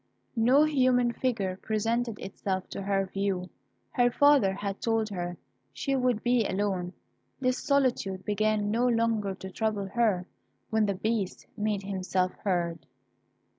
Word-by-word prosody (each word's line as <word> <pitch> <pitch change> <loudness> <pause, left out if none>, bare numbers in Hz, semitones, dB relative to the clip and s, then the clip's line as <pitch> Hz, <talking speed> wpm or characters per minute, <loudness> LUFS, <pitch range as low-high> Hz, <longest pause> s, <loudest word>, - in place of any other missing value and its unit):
No 250 +6 +5
human 255 -5 +3
figure 205 -8 -1
presented 225 +1 -1
itself 190 -1 -4
to - - -5
her 195 0 +1
view; 190 -2 -2 0.4
her 245 -1 +3
father 285 -6 +5
had 200 0 -4
told 225 -1 +1
her 175 -3 -4 0.4
she 275 -1 -1
would 250 -4 +1
be 245 -1 +3
alone. 190 -3 -1 0.5
This 255 -1 +1
solitude 240 -9 +1
began 210 0 +1
no 240 +3 +2
longer 225 -4 +1
to 190 0 -8
trouble 215 0 -1
her, 210 -5 +1 0.5
when 220 -1 +3
the 200 - 0
Beast 210 -1 -2
made 210 -1 -1
himself 185 -1 -1
heard. 175 -4 -1
210 Hz, 135 wpm, -28 LUFS, 190-240 Hz, 0.5 s, No